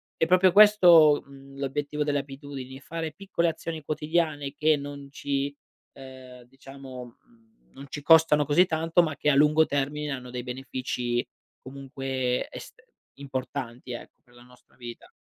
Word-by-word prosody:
è - - +1
proprio 185 +1 +4
questo 175 -8 +7
l'obiettivo 140 +2 -5
delle 145 -1 0
abitudini, 135 -1 -9
fare 160 +2 -5
piccole 170 0 -1
azioni 160 -1 -6
quotidiane, 150 -2 -2
che 155 +1 +2
non 140 0 -8
ci 140 0 -3 0.4
uhm, 130 -2 -13
diciamo 130 -1 -12 0.6
non 140 - -11
ci 145 - -6
costano 160 -1 +5
così 170 +6 +4
tanto, 165 +1 +1
ma 155 -3 -3
che 150 - +1
a 140 - +3
lungo 150 +2 +4
termine, 145 +1 -2
hanno 125 -2 -6
dei 125 0 -5
benefici, 125 -1 -3 0.4
comunque, 135 -1 -3
est - - -11 0.4
importanti, 130 -2 -6
ecco, 120 - -10
per 120 -2 -25
la 120 - -16
nostra 125 0 -23
vita. 120 -1 -10
140 Hz, 140 wpm, -26 LUFS, 130-155 Hz, 0.6 s, questo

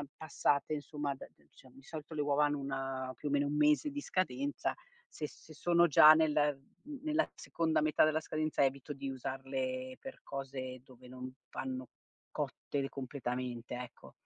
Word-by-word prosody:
passate, 145 -1 +1
insomma 145 -1 -2
da - - -10
diciamo, 130 -1 -20
di 135 - -15
solito 155 +2 -7
le 150 - 0
uova 145 0 +3
hanno 145 0 0
una 135 -1 -3
più 150 - -5
o - - -2
meno 145 0 +3
1 145 - -1
mese 150 - +4
di 290 +1 -4
scadenza 275 +8 -1 0.4
se 155 - -4
s - - -17
se 155 - -12
sono 170 +2 +4
già 155 0 +10
nel, 155 -1 +3 0.5
uhm, 290 -2 -7
nella 310 +1 +2
seconda 165 -1 0
metà 155 0 +4
della 155 0 +2
scadenza 155 -2 0
evito 135 +2 -2
di 135 0 -5
usarle 255 - -3
per 270 - -8
cose 130 -2 -5
dove 125 -1 -15
non 130 0 -7 0.2
vanno 130 -1 -4 0.4
cotte 140 -1 -2
completamente 125 -3 -4
ecco. 125 -1 -9
145 Hz, 170 wpm, -34 LUFS, 130-155 Hz, 0.5 s, già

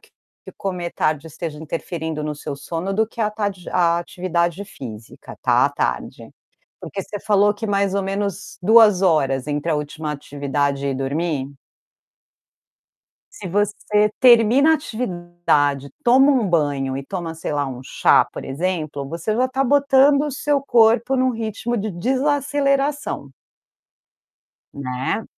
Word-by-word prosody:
que - - -25 0.5
comer 180 -3 -4
tarde 155 0 -1
esteja 160 -1 -6
interferindo 160 0 -4
no 150 0 -3
seu 145 -1 -6
sono, 170 +6 -4
do 220 +2 +1
que 230 - -9
a 215 - +2
atade 205 -4 -4
a 170 -1 +2
atividade 175 +1 -2
física, 115 - -10
tá, - - +3
à - - -3
tarde. - - -3 0.5
Porque 200 - -6
você 205 +2 -7
falou 205 0 +3
que 205 - -7
mais 200 -1 0
ou 200 - 0
menos 195 0 -4
2 210 -2 +6
horas 140 -7 +2
entre 150 +3 -2
a 155 - +2
última 150 +1 -4
atividade 140 -1 -2
e 135 - -1
dormir? 140 +1 -2 1.8
Se 190 - -7
você 210 +2 +1
termina 250 +4 +6
a - - +5
atividade, 175 - -1 0.2
toma 265 +4 +6
um 250 -7 +2
banho 140 -5 0
e - - -5
toma, 170 -1 -5
sei 165 - -5
lá, 145 -1 0
um 130 -2 -6
chá, - - +3
por - - -8
exemplo, 155 -2 -3
você 170 +7 -3
já 255 +3 +2
está 265 +1 -1
botando 280 +1 +4
o - - -3
seu 285 +1 0
corpo 235 0 +3
em 255 - +2
um 260 - +2
ritmo 225 +1 -3
de 210 +1 -3
desaceleração 275 - 0 1.4
né. 130 - -3
185 Hz, 145 wpm, -21 LUFS, 150-225 Hz, 1.8 s, 2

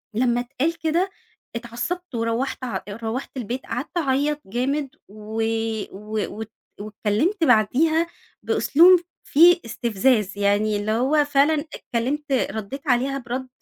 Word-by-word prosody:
لمّا 240 0 +2
اتقال 280 +7 -2
كده 335 +4 +1 0.5
اتعصبت 240 +8 -5
وروّحت 230 +4 -2
ع 245 - -3
روّحت 225 +5 -4
البيت 245 +2 -4
قعدت 280 +8 -4
أعيط 290 0 +1
جامد 270 +7 -1 0.2
و 215 +2 -4 0.5
و 210 +1 -4
وات 220 0 -6 0.3
واتكلمت 215 - -1
بعديها 315 +8 +3 0.4
بأسلوب 350 +5 +5 0.2
فيه 340 +3 +6
استفزاز، 220 -2 +1
يعني 205 +1 +2
اللي 205 +1 -2
هو 270 +7 +2
فعلًا 290 +2 +2
اتكلمت، 275 +5 -3
ردّيت 265 +3 -2
عليها 260 +2 +2
برَد، 255 +1 -5
255 Hz, 120 wpm, -23 LUFS, 220-295 Hz, 0.5 s, فيه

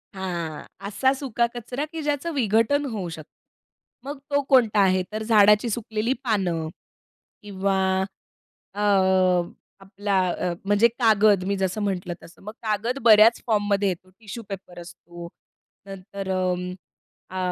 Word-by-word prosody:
हां, 170 -5 -4 0.2
असा 260 +6 +2
सुका 255 -4 -1
कचरा 245 +5 -4
की 325 -1 -5
ज्याचं 295 +3 -1
विघटन 240 +4 +2
होऊ 205 -9 -4
शकतं. 155 -2 -10 0.7
मग 285 +1 -6
तो 285 0 +3
कोणता 230 -6 +4
आहे? 185 -1 +3
तर 215 +1 -4
झाडाची 210 +1 +5
सुकलेली 220 +2 -1
पानं 180 -8 0 0.8
किंवा 195 -1 -1 0.9
अ, 205 - -7 1.0
आपला 195 0 -1
अ, 175 0 -2
म्हणजे 205 +3 +4
कागद 215 -4 +4
मी 200 +1 0
जसं 190 +2 -1
म्हटलं 180 -3 -2
तसं. 170 0 -16
मग 210 - -8
कागद 220 +4 -1
बऱ्याच 225 0 +6
फॉर्ममध्ये 205 -2 +1
येतो 185 +1 -6
टिश्यू 225 +1 -8
पेपर 180 -2 -8
असतो. 170 0 -11 0.6
नंतर 195 0 -8
अं, 180 -1 -1 0.6
अ, 185 - -7
205 Hz, 130 wpm, -24 LUFS, 185-230 Hz, 1.0 s, बऱ्याच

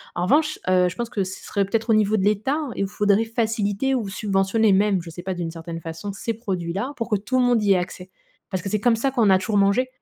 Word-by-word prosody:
En 175 - -1
revanche, 305 +8 +2
heu, 180 -1 +4
je 170 - -9
pense 235 -1 -4
que 205 -5 -1
ce 185 0 -7
serait 200 -1 -1
peut-être 225 +4 -2
au - - +6
niveau 215 0 +3
de 190 - 0
l'État 215 +9 +1 0.2
et - - -1
où - - -1
faudrait 205 +2 +2
faciliter 225 +2 0
ou 215 -6 -2
subventionner 195 +2 +1
même, 195 -1 +2
je 165 - -10
sais 175 +2 -9
pas 190 0 -2
d'une 170 -2 -4
certaine 165 0 -7
façon, 165 +5 -6
ces 230 +3 -3
produits 185 -7 -4
là 225 +8 -3
pour 230 0 -3
que 210 - +2
tout 215 +6 -1
le 250 - +3
monde 240 -3 +2
y 200 -1 +4
ait - - +3
accès. 180 +1 -5 0.4
Parce 185 -3 -3
que - - -6
c'est 210 +1 -1
comme 230 -1 +3
ça 270 +4 0
qu'on 230 -5 +3
a 190 - +6
toujours 205 +2 -1
mangé 200 +6 +3
205 Hz, 275 wpm, -23 LUFS, 190-225 Hz, 0.4 s, au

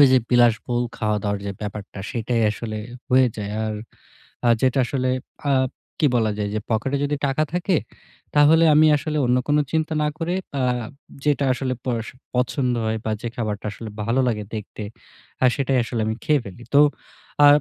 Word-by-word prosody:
ওই 140 - +10
যে 130 - +7
বিলাসবহুল 120 0 +3
খাওয়া-দাওয়ার 105 -2 -1
যে 100 - -2
ব্যাপারটা 105 -1 -6
সেইটাই 115 0 0
আসলে 110 +1 -5 0.3
হয়ে 130 0 +5
যায়। 105 -1 -4
আর 110 -1 -2 0.7
আ - - +5
যেটা 130 +1 +2
আসলে 130 -1 -1 0.4
আব 130 -1 +2 0.3
কি 150 - +5
বলা 110 -2 +2
যায় 105 -1 -1
যে 110 - 0
পকেটে 135 +5 0
যদি 145 +1 0
টাকা 135 +3 +1
থাকে, 180 0 +1 0.6
তাহলে 160 +3 +6
আমি 155 +1 +6
আসলে 150 +1 -2
অন্য 125 +1 +3
কোন 145 - +3 0.2
চিন্তা 160 0 0
না 150 - +2
করে 175 +2 -1 0.3
আ - - +2 0.6
যেটা 145 -1 +2
আসলে 130 0 -2
পড়শো 115 -1 -2 0.2
পছন্দ 125 0 +1
হয় 110 0 0
বা 110 - -1
যে 120 - -2
খাবারটা 110 -2 -3
আসলে 110 +1 -8
ভালো 120 +4 +2
লাগে 105 -3 -1
দেখতে, 105 0 -6 0.6
আ - - +8
সেটাই 135 -2 +1
আসলে 115 -1 -3
আমি 110 - 0
খেয়ে 150 -3 +3
ফেলি। 100 +4 -10
তো 145 - +8 0.6
আ - - +10
125 Hz, 175 wpm, -23 LUFS, 110-140 Hz, 0.7 s, ওই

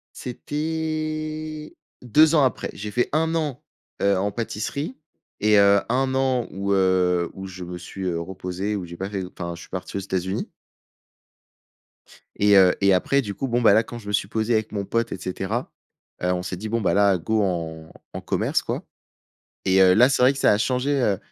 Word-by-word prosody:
C'était 155 +2 -4 0.3
2 155 +6 +5
ans 150 - +5
après. 130 - 0
J'ai 105 +1 -6
fait 120 +3 0
1 160 +1 +1
an, 150 -6 -2 0.4
heu, 100 0 +3
en 100 +2 0
pâtisserie 120 - -4 0.4
et, 105 0 +4
heu, 100 0 +6
1 130 +2 +1
an 130 -2 +1
où, 100 +1 -3
heu, 90 -2 +2
où 95 0 -7
je 95 -1 -8
me 90 0 -6
suis, 95 +2 -8
heu, 85 -2 -1
reposé, 95 +3 -4
où 95 -3 -4
j'ai 85 0 -9
pas 95 +2 -4
fait 100 -2 -3
enfin, 85 -1 -6
je 85 - -11
suis - - -13
parti 95 +1 -5
aux - - -1
États-Unis. 95 0 -3 1.9
Et, 100 0 +5
heu, 95 -2 +6
et 100 -1 +5
après 140 +10 +2
du 105 -5 -5
coup, 135 - -3
bon, 120 0 0
ben, 115 - +6
là, 110 - +4
quand 120 +1 -8
je 105 - -13
me 105 - -3
suis 100 - +1
posé 110 +2 -1
avec 110 -1 0
mon 100 -2 -3
pote, 115 +2 -1
et - - -3
cetera. 95 +6 -4 0.5
Heu, 90 - +1
on 90 0 -2
s'est 90 0 -4
dit: 110 +4 -6
«Bon, 115 +1 0
ben, 100 - +1
là, 100 -1 +4
go 110 +5 0
en 80 -4 -3 0.2
en - - -5
commerce - - 0
quoi». - - -4 0.8
Et, 95 0 +4
heu, 90 -1 +6
là, 125 +6 +6
c'est 135 -2 +1
vrai 130 +2 +6
que 140 - -8
ça - - +4
a 105 - +2
changé, 130 +4 0
heu 100 -6 +1
105 Hz, 210 wpm, -23 LUFS, 95-125 Hz, 1.9 s, heu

